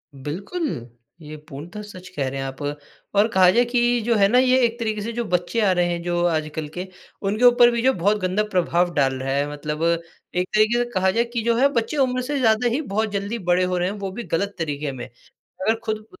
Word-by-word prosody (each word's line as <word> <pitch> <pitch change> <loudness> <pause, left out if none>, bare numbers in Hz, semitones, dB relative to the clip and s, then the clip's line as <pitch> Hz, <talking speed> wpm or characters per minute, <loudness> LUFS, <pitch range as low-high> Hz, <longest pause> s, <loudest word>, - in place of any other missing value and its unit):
बिल्कुल, 195 - -4 0.5
ये 155 0 -9
पूर्णत 160 +9 -9
सच 185 -3 -11
कह 140 -2 -1
रे 135 - -5
हैं 135 - -3
आप 135 0 -7
और 145 +1 -3 0.4
और 205 +2 +5
कहा 185 -1 +6
जाए 240 +3 +4
कि 240 -1 +2
जो 235 -1 +2
है 200 -1 +5
ना 245 +4 +3
ये 255 0 +4
एक 235 0 -2
तरीके 215 -2 -2
से 230 - -4
जो 240 0 -2
बच्चे 180 +4 -1
आ 190 - +4
रहे 180 -1 +2
हैं 170 0 -2
जो 175 0 0
आजकल 155 -1 -2
के, 180 +2 -5 0.3
उनके 210 +4 -1
ऊपर 240 0 +7
भी 235 -1 -1
जो 260 +1 +3
बहुत 205 +3 +1
गंदा 185 +3 +1
प्रभाव 175 -1 +1
डाल 135 -2 +2
रहा 135 +1 -2
है 145 +1 0
मतलब 150 +2 -4 0.5
एक 180 +1 0
तरीके 215 +3 +4
से - - -5
कहा 190 0 +2
जाए 235 +3 +2
कि 235 - 0
जो 235 0 +2
है 270 +3 +5
बच्चे 235 +6 -1
उम्र 255 -2 +1
से 285 +3 -2
ज़्यादा 225 0 +3
ही 250 +6 0
बहुत 220 +1 +1
जल्दी 200 +3 -3
बड़े 180 +1 +4
हो 180 0 0
रहे 180 +1 0
हैं 205 - -5
वो 195 -1 -4
भी 235 +4 -6
गलत 200 +4 0
तरीके 150 -2 -2
में। 125 -2 -7 0.4
अगर 220 +4 -2
खुद 215 0 -3
195 Hz, 240 wpm, -22 LUFS, 170-235 Hz, 0.5 s, ऊपर